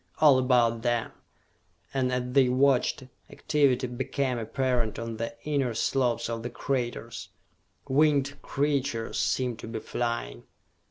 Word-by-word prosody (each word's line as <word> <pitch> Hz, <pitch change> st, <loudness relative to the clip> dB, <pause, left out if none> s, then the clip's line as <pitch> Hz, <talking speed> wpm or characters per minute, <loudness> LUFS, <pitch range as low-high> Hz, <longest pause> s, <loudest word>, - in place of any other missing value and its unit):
All 145 Hz, -4 st, +6 dB
about 120 Hz, -3 st, +3 dB
them 120 Hz, -1 st, 0 dB, 0.8 s
and 130 Hz, -2 st, +1 dB
as 125 Hz, 0 st, 0 dB
they 135 Hz, -2 st, +5 dB
watched, 130 Hz, 0 st, +2 dB, 0.3 s
activity 140 Hz, -4 st, +1 dB
became 130 Hz, 0 st, -2 dB
apparent 120 Hz, -1 st, -1 dB
on 115 Hz, -1 st, -5 dB
the 115 Hz, 0 st, -4 dB
inner 140 Hz, -6 st, 0 dB
slopes 120 Hz, -1 st, +1 dB
of 115 Hz, -1 st, -3 dB
the 120 Hz, -, -4 dB
craters 120 Hz, -2 st, -3 dB, 0.6 s
winged 140 Hz, 0 st, +2 dB
creatures 140 Hz, -5 st, -1 dB
seemed 125 Hz, -3 st, 0 dB
to -, -, -8 dB
be 115 Hz, 0 st, -4 dB
flying. 115 Hz, -, -3 dB
125 Hz, 125 wpm, -27 LUFS, 115-135 Hz, 0.8 s, All